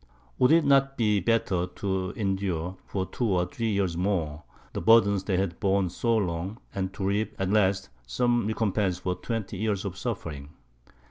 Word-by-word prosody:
Would 125 - +5
it 165 -1 +5
not 135 -1 +3
be 105 -3 +3
better 95 -3 +1
to 95 0 -2
endure, 95 -4 -2
for 95 -2 -2
two 125 +5 -3
or 90 -2 +2
three 115 -3 -3
years 100 -5 0
more, 85 -5 -1 0.3
the - - -3
burdens 100 -4 +5
they 95 -3 +1
had 95 -2 -1
borne 95 -2 +1
so 115 +5 +1
long, 90 +1 -2 0.2
and 95 -1 -2
to 95 - -3
reap 105 +3 0
at 95 0 -1
last 95 -2 +2 0.2
some 120 - +1
recompense 105 -4 0
for 90 0 -2
twenty 110 0 -4
years 105 -1 -1
of 95 -2 -4
suffering? 80 - -5
100 Hz, 175 wpm, -27 LUFS, 90-110 Hz, 0.3 s, Would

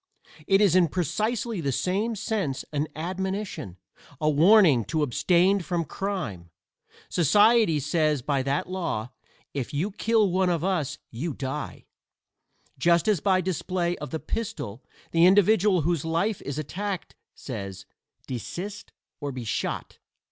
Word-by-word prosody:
It 195 +1 +4
is 195 -4 +4
in 180 -2 +5
precisely 205 - -1
the 140 -3 0
same 200 - 0
sense 200 -9 -2
an 150 +1 0
admonition, 185 - -4 0.4
a 155 0 +2
warning 160 - +6
to 155 - 0
abstain 180 +8 +3
from 170 -1 -2
crime. 155 - -4 0.6
Society 205 - +4
says 150 -1 +1
by 140 -1 +1
that 140 +2 -1
law: 165 -11 -3 0.4
"If 140 +1 -4
you 180 +9 0
kill 215 -1 +2
one 185 0 +2
of 170 -2 0
us 180 -7 -1
you 140 +5 -4
die," 135 +2 -5 0.9
just 170 +5 +3
as 210 -5 +3
by 185 +2 +2
display 180 0 -1
of 150 -2 -6
the 160 - -3
pistol 140 - -5 0.3
the 170 +1 +5
individual 200 -1 +4
whose 165 -1 0
life 170 +6 0
is 140 0 -5
attacked 185 +5 -4 0.2
says: 100 -6 -7 0.4
"Desist 175 - -6 0.3
or 145 -1 -3
be 125 -2 -6
shot." 110 - -3
170 Hz, 135 wpm, -26 LUFS, 145-195 Hz, 0.9 s, warning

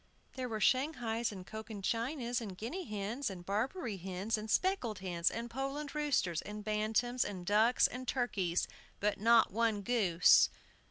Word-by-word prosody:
There 255 -2 -4
were 220 -1 -3
Shanghais 240 -2 +1
and 190 -3 -8
Cochin 220 -1 -7
Chinas, 240 +2 -1
and 195 -5 -7
Guinea 325 - -5
hens, 215 +5 -3
and 180 -2 -8
Barbary 220 - -2
hens, 190 +4 -2
and 215 0 -5
speckled 255 - +1
hens, 180 -2 0
and 235 +1 -4
Poland 275 +4 -4
roosters, 285 - 0
and 210 0 -7
bantams, 220 +4 +1
and 185 -3 -6
ducks, 215 +5 +4
and 255 +1 -3
turkeys, 195 -9 0 0.3
but 205 0 0
not 230 +1 +5
one 220 -1 +1
goose! 190 -7 +5
220 Hz, 155 wpm, -34 LUFS, 200-250 Hz, 0.3 s, not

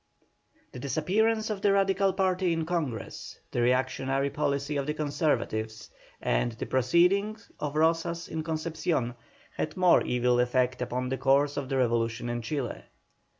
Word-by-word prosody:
The 125 - -8
disappearance 215 - +1
of 200 -2 -4
the 200 0 +4
Radical 195 0 +3
party 185 -2 +1
in 165 -1 -1
Congress, 155 -9 -4
the 120 - 0
reactionary 130 +2 +1
policy 145 0 -1
of 140 0 -1
the 150 - -1
Conservatives, 110 -8 -1 0.3
and 115 - 0
the 115 - -5
proceedings 195 - +2
of 145 0 -3
Rozas 165 +1 +1
at 160 -1 -4
Concepcion, 155 -5 -1 0.4
had 155 - -3
most 180 -1 +4
evil 125 0 +2
effect 125 +1 +1
upon 125 +1 -2
the 135 - -2
course 140 +2 +3
of 140 -2 -4
the 135 - 0
revolution 120 -1 0
in 120 0 -2
Chile. 125 +2 -3
145 Hz, 150 wpm, -28 LUFS, 125-170 Hz, 0.4 s, the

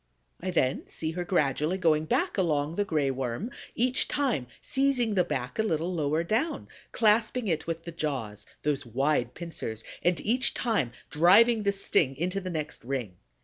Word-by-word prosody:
I 185 - -3
then 135 -7 0
see 160 0 -3
her 175 +2 -3
gradually 155 0 +1
going 160 -4 +2
back 350 - 0
along 155 -5 +1
the 205 - +1
Gray 150 -8 0
Worm, 130 - -3 0.2
each 250 +2 +2
time 250 - 0
seizing 265 -5 +1
the 185 -3 +3
back 125 - -4
a - - +6
little 175 -4 -1
lower 155 0 0
down, 225 - -1 0.2
clasping 220 +1 +2
it 160 -3 -1
with 165 0 -3
the 170 - -6
jaws, 135 - -4 0.2
those 145 -2 0
wide 125 +1 0
pincers, 140 -10 -5 0.2
and 175 0 +2
each 250 +4 +2
time 210 - 0 0.2
driving 215 +9 +6
the 200 -1 +2
sting 155 -8 +2
into 180 +4 -1
the 185 - -5
next 155 -7 -4
ring. 120 -8 -4
165 Hz, 170 wpm, -28 LUFS, 145-205 Hz, 0.2 s, a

